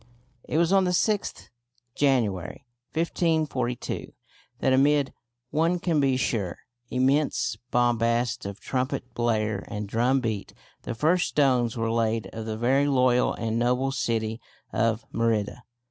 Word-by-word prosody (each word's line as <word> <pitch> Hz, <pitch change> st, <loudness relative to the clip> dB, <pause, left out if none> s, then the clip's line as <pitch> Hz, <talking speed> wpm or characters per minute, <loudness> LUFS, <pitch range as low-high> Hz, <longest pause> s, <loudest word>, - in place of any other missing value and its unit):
It -, -, -1 dB
was 170 Hz, +2 st, +3 dB
on 195 Hz, -1 st, +5 dB
the 180 Hz, 0 st, +1 dB
6th 210 Hz, -2 st, -1 dB, 0.4 s
January, 110 Hz, -12 st, 0 dB, 0.3 s
1542, 155 Hz, -7 st, -1 dB, 0.4 s
that 130 Hz, -, +2 dB
amid 140 Hz, +1 st, +3 dB, 0.4 s
one 165 Hz, +4 st, +2 dB
can 170 Hz, -3 st, 0 dB
be 135 Hz, -2 st, +2 dB
sure 110 Hz, -7 st, -1 dB, 0.3 s
immense 135 Hz, -1 st, +1 dB
bombast 120 Hz, -1 st, +1 dB
of 100 Hz, 0 st, -7 dB
trumpet 130 Hz, -1 st, -3 dB
blare 110 Hz, -4 st, 0 dB
and 105 Hz, 0 st, -5 dB
drum 120 Hz, +6 st, +2 dB
beat 110 Hz, -5 st, -4 dB, 0.3 s
the -, -, -5 dB
first 170 Hz, +10 st, +2 dB
stones 125 Hz, -5 st, +2 dB
were 115 Hz, 0 st, 0 dB
laid 115 Hz, -3 st, 0 dB
of 115 Hz, 0 st, -6 dB
the 110 Hz, -1 st, -3 dB
"Very 135 Hz, +5 st, +2 dB
Loyal 125 Hz, -3 st, +3 dB
and 115 Hz, 0 st, -2 dB
Noble 125 Hz, +3 st, +1 dB
City 115 Hz, -3 st, -1 dB, 0.3 s
of 115 Hz, 0 st, +1 dB
Merida." 115 Hz, 0 st, 0 dB
125 Hz, 130 wpm, -26 LUFS, 115-140 Hz, 0.4 s, on